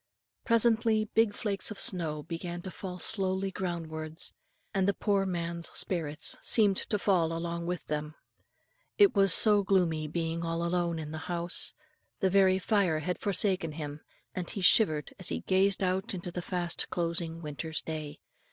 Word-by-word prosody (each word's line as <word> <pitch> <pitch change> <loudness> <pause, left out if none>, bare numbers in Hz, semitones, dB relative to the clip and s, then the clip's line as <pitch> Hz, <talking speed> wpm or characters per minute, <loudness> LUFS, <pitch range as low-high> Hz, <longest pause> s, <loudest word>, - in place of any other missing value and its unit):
Presently 225 -2 +2
big 220 -2 +3
flakes 200 -3 -1
of 215 - -7
snow 155 -5 +1
began 175 +1 -6
to 190 - -6
fall 185 -2 -7
slowly 190 -1 0
ground 175 -3 -3
wards, 155 0 -4 0.4
and 195 -2 +1
the 200 - +2
poor 200 -2 +1
man's 170 -1 -2
spirits 160 -4 0
seemed 205 -4 +3
to 210 - -1
fall 180 -5 +1
along 170 0 -4
with 180 -2 -3
them. 150 0 -4 0.8
It 405 -3 +6
was 195 -2 +4
so 210 +3 +6
gloomy 175 -6 +1
being 165 +1 -3
all 165 0 -2
alone 170 -1 0
in 155 -1 -6
the 155 - -5
still - - -9
house; 170 +1 +2 0.5
the 190 -2 +1
very 190 -1 +4
fire 190 -4 +1
had 180 +3 -3
forsaken 185 -4 +1
him; 150 -1 -6 0.3
and 180 -2 -4
he 200 - -5
shivered 180 - +4
as - - -1
he 80 -1 -3
gazed 195 - +2
out 190 +3 -1
into 175 -1 -6
the 180 - -4
fast 175 -1 -1
closing 170 -1 -3
winter's 155 +1 -4
day. 155 -2 -6
175 Hz, 170 wpm, -29 LUFS, 165-195 Hz, 0.8 s, It